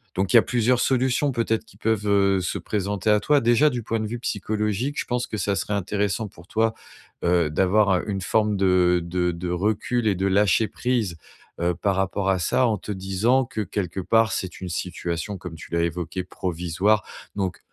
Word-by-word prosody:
Donc 95 Hz, +3 st, 0 dB
il -, -, +9 dB
y -, -, +10 dB
a -, -, +4 dB
plusieurs 125 Hz, +1 st, +1 dB
solutions 130 Hz, +2 st, +2 dB
peut-être, 115 Hz, -3 st, 0 dB
qui 120 Hz, -, -20 dB
peuvent, 110 Hz, -2 st, 0 dB
heu, 100 Hz, -1 st, +3 dB
se 90 Hz, -, -2 dB
présenter 100 Hz, 0 st, -2 dB
à 105 Hz, -, +4 dB
toi. 145 Hz, +5 st, +3 dB
Déjà 120 Hz, +6 st, +4 dB
du 120 Hz, -4 st, -4 dB
point 115 Hz, +1 st, -1 dB
de 110 Hz, -, -2 dB
vue 120 Hz, +3 st, -5 dB
psychologique, 105 Hz, +5 st, -2 dB
je -, -, -2 dB
pense 125 Hz, 0 st, -2 dB
que 110 Hz, -, -4 dB
ça 100 Hz, 0 st, 0 dB
serait 95 Hz, +4 st, -2 dB
intéressant 100 Hz, +2 st, -1 dB
pour 85 Hz, -2 st, -16 dB
toi, 110 Hz, +1 st, +1 dB, 0.5 s
heu, 85 Hz, -2 st, +2 dB
d'avoir, 95 Hz, +5 st, +3 dB
heu, -, -, -5 dB
une 100 Hz, -1 st, -1 dB
forme 105 Hz, +2 st, +1 dB
de 90 Hz, -2 st, +3 dB
de 90 Hz, +1 st, 0 dB
de 85 Hz, +1 st, -5 dB
recul 110 Hz, +6 st, 0 dB
et 100 Hz, -, +2 dB
de 95 Hz, +2 st, -1 dB
lâcher 105 Hz, +2 st, +3 dB
prise, 120 Hz, -9 st, -1 dB, 0.5 s
heu, 85 Hz, 0 st, +1 dB
par 95 Hz, +3 st, 0 dB
rapport 95 Hz, +1 st, 0 dB
à 95 Hz, -1 st, +2 dB
ça, 110 Hz, +9 st, +2 dB
en 110 Hz, -3 st, +1 dB
te 105 Hz, -, -7 dB
disant 100 Hz, +7 st, +1 dB
que 110 Hz, -, -4 dB
quelque 95 Hz, -2 st, -3 dB
part, 115 Hz, +4 st, +3 dB
c'est 95 Hz, -, -4 dB
une 90 Hz, -, -5 dB
situation, 85 Hz, +2 st, -4 dB
comme 90 Hz, -3 st, -8 dB
tu 80 Hz, -, -12 dB
l'as 85 Hz, 0 st, +1 dB
évoqué, 85 Hz, +2 st, -3 dB
provisoire. 90 Hz, +4 st, 0 dB, 0.3 s
Donc 95 Hz, -3 st, -2 dB
100 Hz, 205 wpm, -24 LUFS, 90-110 Hz, 0.5 s, y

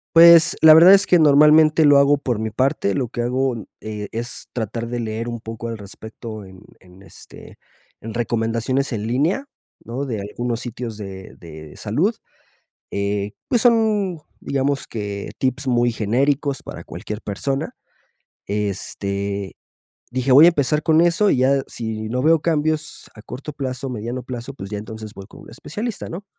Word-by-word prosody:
Pues, 170 Hz, -1 st, +8 dB
la 160 Hz, -, +10 dB
verdad 175 Hz, +5 st, +9 dB
es 200 Hz, 0 st, +3 dB
que 175 Hz, -, +4 dB
normalmente 155 Hz, +1 st, +6 dB
lo 145 Hz, -1 st, +6 dB
hago 140 Hz, +1 st, +5 dB
por 125 Hz, -5 st, -2 dB
mi 110 Hz, 0 st, -3 dB
parte, 110 Hz, -3 st, 0 dB
lo 130 Hz, -3 st, -1 dB
que 120 Hz, -, -4 dB
hago, 130 Hz, +2 st, 0 dB
n 110 Hz, -5 st, -8 dB
eh, 105 Hz, -1 st, -6 dB
es 120 Hz, +2 st, -6 dB
tratar 115 Hz, 0 st, -3 dB
de 120 Hz, 0 st, -3 dB
leer 115 Hz, +1 st, -4 dB
un 120 Hz, -, -4 dB
poco 115 Hz, +1 st, -7 dB
al 115 Hz, -, -4 dB
respecto 110 Hz, +1 st, -9 dB
en 95 Hz, -1 st, -14 dB, 0.2 s
en, 90 Hz, +1 st, -18 dB
este, 95 Hz, -, -14 dB, 0.4 s
en 110 Hz, 0 st, -8 dB
recomendaciones 115 Hz, +3 st, -1 dB
en 110 Hz, -1 st, -3 dB
línea, 155 Hz, -, 0 dB, 0.4 s
¿no? 125 Hz, +4 st, -4 dB
De 110 Hz, -5 st, -3 dB
algunos 115 Hz, +3 st, -4 dB
sitios 120 Hz, -2 st, -6 dB
de 95 Hz, -2 st, -9 dB
de 80 Hz, -2 st, -12 dB
salud. -, -, 0 dB, 0.8 s
Eh, 100 Hz, 0 st, -2 dB, 0.2 s
pues 240 Hz, -4 st, +2 dB
son, 215 Hz, -7 st, +2 dB, 0.2 s
digamos, 140 Hz, 0 st, -1 dB
que 100 Hz, -2 st, -5 dB
tips 130 Hz, +1 st, -1 dB
muy 120 Hz, -1 st, +2 dB
genéricos 135 Hz, +6 st, 0 dB
para 85 Hz, -, -9 dB
cualquier 90 Hz, +7 st, -7 dB
persona. 135 Hz, +7 st, -3 dB, 0.7 s
Este, 100 Hz, -1 st, -3 dB, 0.6 s
dije: 130 Hz, +1 st, -1 dB
"Voy 145 Hz, +5 st, +9 dB
a -, -, +8 dB
empezar 150 Hz, -2 st, 0 dB
con 160 Hz, -1 st, +4 dB
eso 175 Hz, +4 st, +3 dB
y -, -, +2 dB
ya 135 Hz, +1 st, +2 dB
si 110 Hz, -2 st, -5 dB
no 125 Hz, +2 st, -1 dB
veo 160 Hz, +3 st, +4 dB
cambios 155 Hz, -1 st, -1 dB
a 110 Hz, -, -12 dB
corto 130 Hz, +7 st, -8 dB
plazo, 135 Hz, -1 st, -4 dB
mediano 120 Hz, +1 st, -4 dB
plazo, 125 Hz, +1 st, -7 dB
pues 95 Hz, -7 st, -9 dB
ya 105 Hz, -, -4 dB
entonces 110 Hz, 0 st, -9 dB
voy 100 Hz, -, -9 dB
con -, -, -15 dB
un -, -, -14 dB
especialista", 220 Hz, +6 st, -6 dB
¿no? 185 Hz, +5 st, -7 dB
120 Hz, 170 wpm, -21 LUFS, 110-145 Hz, 0.8 s, la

